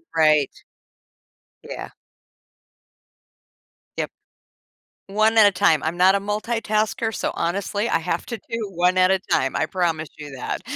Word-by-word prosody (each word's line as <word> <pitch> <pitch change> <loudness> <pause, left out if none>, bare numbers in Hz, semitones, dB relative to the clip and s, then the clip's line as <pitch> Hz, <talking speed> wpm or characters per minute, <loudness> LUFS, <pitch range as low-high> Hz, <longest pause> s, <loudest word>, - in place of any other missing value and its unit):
Right. 155 -3 +3 1.1
Yeah. - - -7 2.1
Yep. - - -1 1.0
One 215 +3 +2
at 220 - +8
a 205 - +6
time. 180 -5 +2
I'm 160 +2 -2
not 185 +2 +5
a - - +1
multitasker, 215 +1 -1
so, - - -2
honestly, 200 +4 -1
I - - +1
have 165 +1 -3
to 235 - -4
do 225 0 -5
one 180 +1 +2
at 185 0 +5
a 190 - +2
time, 135 -7 0
I 155 - 0
promise 160 -3 -1
you 145 -2 -9
that. 125 - -4
185 Hz, 140 wpm, -22 LUFS, 160-210 Hz, 2.1 s, at